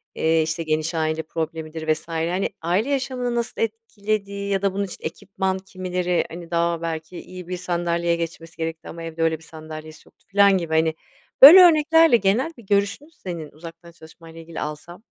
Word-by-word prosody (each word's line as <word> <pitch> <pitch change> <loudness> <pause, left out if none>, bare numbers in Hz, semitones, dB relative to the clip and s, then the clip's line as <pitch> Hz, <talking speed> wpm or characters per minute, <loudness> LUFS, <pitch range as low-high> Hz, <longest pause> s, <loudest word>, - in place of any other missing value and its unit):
eee, 160 0 +2
işte, 160 +1 -2
geniş 155 +1 -1
aile 160 0 -1
problemidir 160 0 -3
vs. 155 0 -9
Hani, 170 +3 -1
aile 185 +10 0
yaşamını 255 -3 -2
nasıl 235 -1 -3
etkilediği 210 -2 -3
ya 195 -1 +1
da 195 -1 0
bunun 200 - -1
için 190 - -8
ekipman 190 +3 -3
kimileri, 180 -2 -2
hani, 170 0 -10
daha 170 0 0
belki 165 +1 -5
iyi 185 -1 -10
bir 180 0 -4
sandalyeye 170 -1 -1
geçmesi 165 0 -6
gerekti 165 0 -5
ama 165 0 -8
evde 165 0 -4
öyle 160 -1 +1
bir 165 - -19
sandalyesi 155 -1 -11
yoktu - - -27
filan 200 -1 +4
gibi, 165 -3 -4
hani, 160 0 +2 0.5
böyle 305 +8 +12
örneklerle 325 -4 +6
genel 220 +10 +1
bir 235 - -14
görüşünü 200 +9 0
senin 170 - -7
uzaktan 165 +2 -12
çalışmayla 165 0 -15
ile 165 - -10
ilgili 165 0 -8
alsam? 150 +6 -7
170 Hz, 180 wpm, -23 LUFS, 160-200 Hz, 0.5 s, böyle